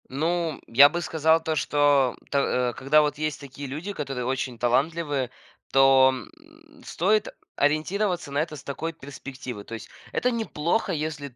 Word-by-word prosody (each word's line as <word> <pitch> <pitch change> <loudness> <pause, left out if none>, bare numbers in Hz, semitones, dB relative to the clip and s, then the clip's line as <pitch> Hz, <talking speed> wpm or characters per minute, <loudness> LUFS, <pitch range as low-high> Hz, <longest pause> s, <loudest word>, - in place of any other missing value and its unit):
Ну, 160 +3 -1
я 140 +5 +8
бы 175 +2 -3
сказал, 160 0 +2
то, 160 -1 -1
что 145 -4 +2
то 125 -3 +1
а, - - -5
когда 140 +5 +3
вот 150 -1 -1
есть 155 -1 -2
такие 140 0 -8
люди, 155 +10 -5
которые 135 -6 -4
очень 130 -1 -2
талантливы, 140 +2 0 0.4
то, 135 -1 +6
м, 320 - -13
стоит 210 +2 +1 0.3
ориентироваться 175 +3 0
на 140 - 0
это 155 0 -2
с 140 - -11
такой 160 +4 -4
перспективы. 130 -5 -8
То 115 - -11
есть 115 - -10 0.2
это 250 - +1
неплохо, 220 -3 -1
если 150 -5 -4
150 Hz, 160 wpm, -25 LUFS, 135-170 Hz, 0.4 s, я